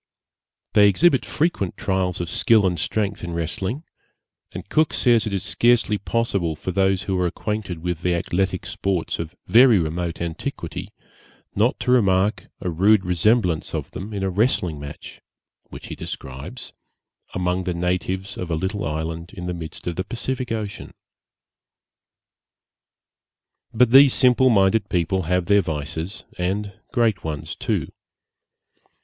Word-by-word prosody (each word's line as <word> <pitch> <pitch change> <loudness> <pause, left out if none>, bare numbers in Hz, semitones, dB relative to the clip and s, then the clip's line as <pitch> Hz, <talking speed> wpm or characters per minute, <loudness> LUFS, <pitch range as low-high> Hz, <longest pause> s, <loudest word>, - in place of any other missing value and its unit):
They 105 -1 +7
exhibit 140 - +3
frequent 150 - -1
trials 95 -2 -1
of 85 - -3
skill 110 +4 +3
and 90 -3 0
strength 100 +3 -1
in 85 -1 -4
wrestling; 95 - -3 0.7
and - - -8
Cook 155 0 +2
says 120 -3 +3
it 105 - -3
is 95 - -2
scarcely 120 -3 +2
possible 100 -7 -1
for 95 - -4
those 95 0 +1
who 95 -2 -1
are 90 - +2
acquainted 95 -3 -4
with 90 -2 -2
the 90 -1 +1
athletic 95 +2 -1
sports 95 -4 -2
of 85 +2 -5
very 120 -1 +6
remote 85 0 -2
antiquity, 85 -2 -5 0.6
not 110 +5 +1
to 125 - +1
remark 100 -4 +2
a 90 - -2
rude 95 +4 +4
resemblance 90 -1 +1
of - - -4
them 100 +4 -7
in 100 -2 -3
a 95 - 0
wrestling 90 - +1
match 70 0 -9 0.5
(which - - -10
he - - -6
describes) 65 +1 -7 0.6
among 90 0 -1
the 90 - -1
natives 90 +2 -2
of 90 - -4
a 80 - 0
little 95 +5 -2
island 80 +2 -4
in 90 - -6
the 90 - -2
midst 80 -2 -8
of 85 - -3
the 95 - 0
Pacific 125 +3 -4
Ocean. 105 -3 -5 2.8
But 120 +1 +3
these 135 0 +8
simple 130 0 +5
minded 100 -1 +3
people 95 +2 0
have 90 -1 +1
their 100 +1 +4
vices, 80 +4 -5 0.2
and 100 +3 -2 0.2
great 115 -6 +1
ones 75 -2 -4
too. - - -2
95 Hz, 145 wpm, -23 LUFS, 85-110 Hz, 2.8 s, these